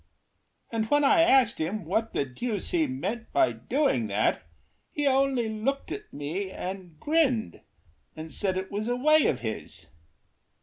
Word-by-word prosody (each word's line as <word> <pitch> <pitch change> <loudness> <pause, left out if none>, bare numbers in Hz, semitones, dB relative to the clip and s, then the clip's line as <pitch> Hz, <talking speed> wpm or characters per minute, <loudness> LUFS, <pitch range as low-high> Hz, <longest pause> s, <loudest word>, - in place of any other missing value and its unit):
And 225 -1 0
when 290 0 +4
I 285 +4 +5
asked 265 -8 +4
him 175 +4 -2
what 220 +6 -1
the 140 - -1
deuce 205 - -4
he 325 -3 +2
meant 235 -3 -4
By 335 -1 +3
doing 245 - 0
that, 105 +1 +1 0.5
he 295 - -2
only 270 -3 +2
looked 220 +6 -2
at 420 - -7
me 160 +8 -4
And 185 -4 -7
grinned, 290 -8 +1 0.5
and 160 0 -8
said 190 -2 -1
it 190 0 -4
was 210 +2 -3
a 245 - +1
way 305 +4 +4
of 125 - 0
his. 110 -2 -6
225 Hz, 160 wpm, -27 LUFS, 185-275 Hz, 0.5 s, I